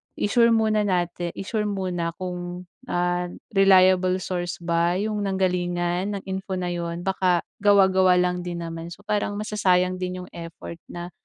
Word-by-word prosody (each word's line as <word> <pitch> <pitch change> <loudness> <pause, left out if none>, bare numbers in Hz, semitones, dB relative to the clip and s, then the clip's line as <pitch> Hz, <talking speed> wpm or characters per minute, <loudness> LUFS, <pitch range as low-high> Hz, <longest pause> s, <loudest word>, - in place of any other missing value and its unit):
i-sure 230 +3 +3
muna 220 -2 +3
natin 175 -1 -1
i-sure 210 +1 -2
muna 180 -4 -2
kung, 180 -1 -5 0.2
ah, 175 0 0 0.2
reliable 185 -2 +5
source 175 -2 -3
ba 170 +1 +1
yung 210 +2 -1
nanggalingan 180 0 0
ng - - -17
info 190 0 -3
na 180 - -2
yun, 170 0 -4
baka 185 -2 +1 0.2
gawa-gawa 190 -2 +5
lang 180 0 +1
din 175 -1 -4
naman. 165 0 -6
So, 205 - -16
parang 205 -1 -1
masasayang 185 -3 +1
din 180 0 -4
yung 180 - -12
effort 170 0 -9
na 175 +1 -7
180 Hz, 150 wpm, -24 LUFS, 175-195 Hz, 0.2 s, reliable